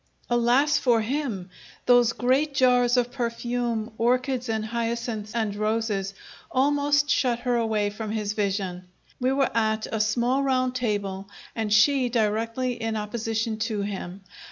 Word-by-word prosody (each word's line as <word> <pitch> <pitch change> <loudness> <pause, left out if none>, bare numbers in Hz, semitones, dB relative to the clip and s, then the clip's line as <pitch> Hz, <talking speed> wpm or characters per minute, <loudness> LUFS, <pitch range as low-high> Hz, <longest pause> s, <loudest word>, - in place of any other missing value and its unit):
Alas 250 +5 +3
for 240 -4 +3
him! 220 -7 -3 0.3
Those 245 -2 +5
great 270 +5 +1
jars 250 -1 +4
of 245 0 +1
perfume, 240 -2 -2
orchids 250 +1 +1
and 220 -1 -1
hyacinths 230 -1 -3
and 220 -3 -1
roses, 215 -2 -1 0.3
almost 290 +2 +2
shut 245 -4 +1
her 245 0 0
away 220 -3 0
from 215 +1 -6
his 210 -1 -2
vision. 195 -3 -2 0.3
We 255 +1 +1
were 270 -2 +1
at 220 -1 +1
a 220 - -1
small 240 +5 +1
round 255 -2 +1
table, 200 -5 -2 0.3
and 220 -2 -2
she 250 +4 +4
directly 230 +2 -1
in 225 0 -2
opposition 220 +1 -2
to 215 -2 -1
him. 195 -2 -5
230 Hz, 140 wpm, -25 LUFS, 215-250 Hz, 0.3 s, Those